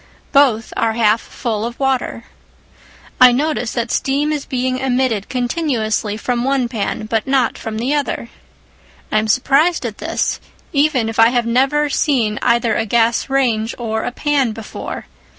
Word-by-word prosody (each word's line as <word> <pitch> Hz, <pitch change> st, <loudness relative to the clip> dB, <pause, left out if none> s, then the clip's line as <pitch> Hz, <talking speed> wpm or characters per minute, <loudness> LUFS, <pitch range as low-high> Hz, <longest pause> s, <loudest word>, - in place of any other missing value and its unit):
Both 255 Hz, -6 st, +3 dB
are 225 Hz, -1 st, +1 dB
half 220 Hz, -1 st, +2 dB
full 220 Hz, -3 st, -4 dB
of 235 Hz, +1 st, -5 dB
water. 265 Hz, -3 st, -1 dB, 1.0 s
I 255 Hz, -1 st, +9 dB
notice 275 Hz, -2 st, -1 dB
that 235 Hz, -1 st, -2 dB
steam 285 Hz, +3 st, 0 dB
is 295 Hz, -2 st, -3 dB
being 255 Hz, 0 st, -1 dB
emitted 255 Hz, -5 st, 0 dB
continuously 240 Hz, -5 st, -1 dB
from 240 Hz, +1 st, -1 dB
the 250 Hz, -, -1 dB
one 270 Hz, -3 st, +1 dB
pan, 215 Hz, -2 st, -3 dB
but 225 Hz, +2 st, -1 dB
not 265 Hz, -3 st, +2 dB
from 220 Hz, -1 st, -6 dB
the 250 Hz, +6 st, -1 dB
other. 285 Hz, -5 st, -2 dB, 0.8 s
I 215 Hz, -, +3 dB
am 220 Hz, -, -2 dB
surprised 275 Hz, +7 st, +2 dB
at 220 Hz, -3 st, -5 dB
this, -, -, -1 dB, 0.3 s
even 280 Hz, -5 st, +2 dB
if 225 Hz, 0 st, -4 dB
I 225 Hz, 0 st, +7 dB
have 240 Hz, -1 st, 0 dB
never 270 Hz, +5 st, +2 dB
seen 245 Hz, -7 st, 0 dB
either 235 Hz, -1 st, +2 dB
a 220 Hz, -, -1 dB
gas 230 Hz, +3 st, +2 dB
range 235 Hz, -5 st, 0 dB
or 220 Hz, -2 st, -2 dB
a -, -, -3 dB
pan 275 Hz, -4 st, 0 dB
before. 220 Hz, -1 st, -7 dB
245 Hz, 165 wpm, -18 LUFS, 225-270 Hz, 1.0 s, I